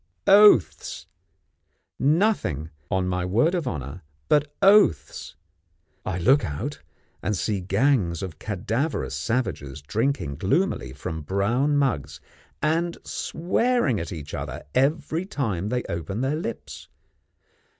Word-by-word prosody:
Oaths, 205 - +5 0.9
nothing, 140 - +1 0.2
on 95 -1 0
my 90 -1 -1
word 115 - +2
of 170 -7 -1
honour, 75 - -5 0.3
but 150 -1 +3
oaths! 195 - +3 0.7
I - - -3
look 130 +11 +4
out, 110 - -4 0.4
and 105 -2 -1
see 100 0 -1
gangs 100 - +1
of 85 -4 -7
cadaverous 110 - -2
savages 95 - -2
drinking 95 - -1
gloomily 100 - 0
from 80 +4 -5
brown 115 - +1
mugs, 135 - -1 0.4
and 165 +2 +1
swearing 180 - 0
at 85 - -5
each 75 -4 -7
other - - -5
every 150 +4 +1
time 105 - -2
they 125 +1 -1
open 85 +5 -4
their 135 +3 0
lips. 115 -8 -6
110 Hz, 115 wpm, -25 LUFS, -, 0.9 s, Oaths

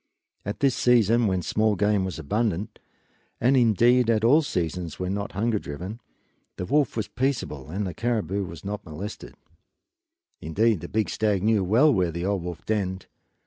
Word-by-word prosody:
But - - -5
at 105 - -5
this 135 -2 +4
season 120 -1 +3
when 95 -2 0
small 110 +3 +1
game 105 0 +2
was 95 - -5
abundant 105 +5 -2 0.6
and 130 +3 +3
indeed 120 0 +4
at 110 -1 +2
all 140 +8 +6
seasons 90 - -3
when 90 +1 -2
not 100 0 -4
hunger 110 +2 0
driven 90 +11 -7 0.5
the 90 - -4
wolf 145 +2 +1
was 110 - -1
peaceable 120 - -2
and 100 +5 -3
the 90 - -4
caribou 100 -3 -1
were 85 -3 -7
not 105 +1 -5
molested. 90 +6 -8 1.1
Indeed 105 +5 +1
the - - -8
big 110 0 0
stag 105 -4 0
knew 110 -2 +3
well 120 +11 +4
where 90 -5 +1
the 85 +2 -4
old 100 -1 0
wolf 85 -1 -7
denned. 95 -4 -2
105 Hz, 175 wpm, -25 LUFS, 90-115 Hz, 1.1 s, all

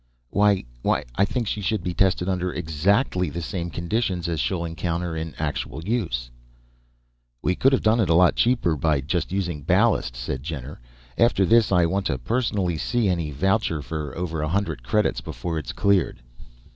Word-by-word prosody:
"Why... 100 -1 +3 0.2
why - - +1
I 100 - +3
think 120 +2 -2
she 105 - -2
should 105 +3 -1
be 90 - -2
tested 90 0 +2
under 90 -1 -1
exactly 90 - +1
the 80 +4 -5
same 85 0 -3
conditions 90 0 -1
as 85 -2 -2
she'll 85 +7 -1
encounter 85 0 -3
in 80 0 -5
actual 75 0 -3
use." 85 - -2 1.1
"We 90 - +2
could 135 +8 +3
have 135 - +2
done 110 +2 +4
it 105 - +2
a 80 - +4
lot 90 0 +5
cheaper 120 -9 +2
by 75 -1 +1
just 85 +6 -2
using 90 -6 -2
ballast," 90 - +2
said 65 +1 -4
Jenner. 70 -4 -6 0.4
"After 115 -4 +4
this, 115 +2 +4
I 90 -3 +4
want 95 +3 0
to 70 - -1
personally 100 - -1
see 120 0 +1
any 85 -4 -1
voucher 85 +1 0
for 75 -2 -5
over 85 -3 -2
a 75 - -1
hundred 100 -7 -1
credits 105 - 0
before 85 -2 -4
it's 75 - -6
cleared." 95 -11 +1
90 Hz, 180 wpm, -24 LUFS, 80-100 Hz, 1.1 s, lot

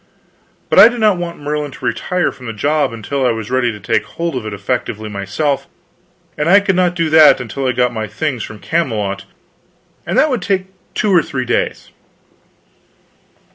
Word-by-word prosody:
But - - +6
I - - +11
did 240 0 -3
not 210 -4 +3
want 175 -1 -5
Merlin 150 0 -3
to - - -9
retire 180 -1 0
from 125 - -11
the 115 - -4
job 145 +6 0
until 115 +5 -3
I 125 - +3
was 115 -1 -3
ready 130 -2 +1
to 105 - -9
take - - 0
hold 170 -3 -4
of 115 -4 -4
it - - -4
effectively 110 +1 -3
myself; 105 +9 -2 0.7
and 150 +2 0
I 200 +3 +8
could 195 -2 0
not 180 -1 +2
do 165 -3 0
that 155 -3 +7
until 125 +3 -4
I - - +2
got 125 0 +1
my 110 -1 -3
things 125 +4 -3
from 110 - -7
Camelot, 105 -10 -2 0.8
and - - -2
that 305 - +4
would 245 -6 -1
take 190 0 -2 0.2
two 205 -2 +1
or 170 - +6
three 130 -4 -4
days. - - -2
140 Hz, 190 wpm, -17 LUFS, 115-170 Hz, 0.8 s, I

